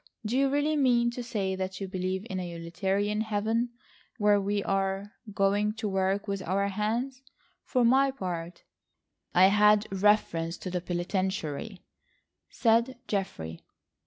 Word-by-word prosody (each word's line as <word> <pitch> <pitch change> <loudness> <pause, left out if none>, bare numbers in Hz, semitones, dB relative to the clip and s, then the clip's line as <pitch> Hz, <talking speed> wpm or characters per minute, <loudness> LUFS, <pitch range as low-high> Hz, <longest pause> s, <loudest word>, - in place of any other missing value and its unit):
Do 220 +4 -1
you 275 +1 +3
really 290 +2 +1
mean 240 -4 +3
to 245 - -5
say 205 -6 -2
that 190 0 -4
you 195 - -4
believe 185 +1 -3
in 190 -5 -3
a 180 -1 -4
utilitarian 190 +5 -1
Heaven, 220 +2 0 0.5
where 205 -2 +4
we 200 0 -1
are 195 +1 -1 0.2
going 205 +2 +1
to 220 -1 -4
work 195 +1 0
with 200 -1 -2
our 200 +2 0
hands? 230 +6 -2 0.4
For 250 -3 +2
my 265 +3 +5
part—" 180 -8 -5 0.7
"I 185 +2 +7
had 210 +1 +5
reference 185 -4 +2
to 185 - -6
the 180 -1 -1
penitentiary," 180 +1 -3 0.7
said 235 +2 +2
Geoffrey. 85 - -3
200 Hz, 140 wpm, -28 LUFS, 190-225 Hz, 0.7 s, I